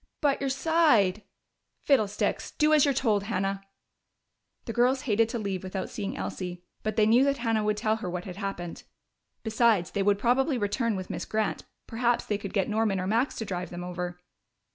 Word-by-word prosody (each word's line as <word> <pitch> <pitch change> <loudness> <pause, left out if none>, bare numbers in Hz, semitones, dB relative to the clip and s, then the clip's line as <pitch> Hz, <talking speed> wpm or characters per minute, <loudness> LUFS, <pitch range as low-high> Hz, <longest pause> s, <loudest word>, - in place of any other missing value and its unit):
"But 285 -2 +1
your 275 - 0
side 265 - +3 0.3
" - - -53
"Fiddlesticks! 215 -8 +1
Do 305 0 +4
as 300 -2 +6
you're 285 - +3
told, 210 -6 +1
Hannah." 195 -2 -1 1.0
The 230 - -4
girls 250 +3 +3
hated 225 -3 +2
to 235 - -3
leave 200 -4 -3
without 190 0 -4
seeing 200 -1 -4
Elsie, 180 -1 -5 0.2
but 215 -1 -2
they 215 -1 +4
knew 235 +4 +5
that 280 0 +2
Hannah 225 -2 0
would 210 0 0
tell 220 +1 +1
her 200 -5 -5
what 180 0 -4
had 185 -2 -7
happened. 195 -4 -5 0.6
Besides, 220 -5 +2
they 200 - -1
would 200 0 +3
probably 255 +6 +2
return 220 +1 0
with 185 -1 -5
Miss - - -4
Grant; 215 0 -2 0.2
perhaps 235 +1 0
they 205 -1 -1
could 200 -2 -6
get 195 -3 +1
Norman 215 -2 +1
or 185 - -2
Max 230 +7 +1
to 225 - -4
drive 180 -2 -4
them 175 0 -6
over. 180 0 -5
215 Hz, 195 wpm, -28 LUFS, 195-240 Hz, 1.0 s, as